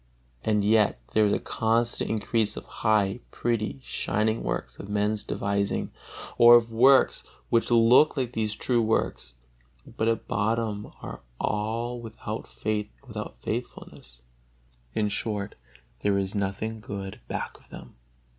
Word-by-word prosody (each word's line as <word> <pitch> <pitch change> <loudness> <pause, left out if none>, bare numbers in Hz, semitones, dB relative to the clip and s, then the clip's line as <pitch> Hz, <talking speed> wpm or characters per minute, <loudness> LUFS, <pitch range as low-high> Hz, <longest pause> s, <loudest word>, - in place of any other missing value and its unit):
And 105 -2 +2
yet 105 - +3
there 110 -1 +5
is 100 - +2
a - - +3
constant 115 +1 0
increase 110 0 0
of - - -7
high, 105 -1 +1
pretty, 115 +1 -1
shining 110 +1 0
works - - -4
of 100 - -8
men's 105 +1 0
devising, 100 0 -1 0.5
or 120 0 +10
of 115 -1 +3
works 130 +4 +5 0.3
which 115 -1 +3
look 120 +6 +5
like 125 -2 -1
these 110 -2 -1
true 120 +1 +1
works, 110 - -1 0.5
but 110 - -2
at 115 0 0
bottom 110 -1 -1
are - - -7 0.2
all 115 +4 -1
without 110 -1 -6
faith 105 -1 -2
and 135 - -19
without 105 -1 -6
faithfulness; 110 - -6 0.7
in 105 - +2
short, 105 0 -2 0.5
there 100 +5 +1
is 95 0 -1
nothing 105 +2 -2
good 100 -2 -6
back - - -4
of - - -25
them. - - -11
110 Hz, 140 wpm, -27 LUFS, 105-115 Hz, 0.7 s, or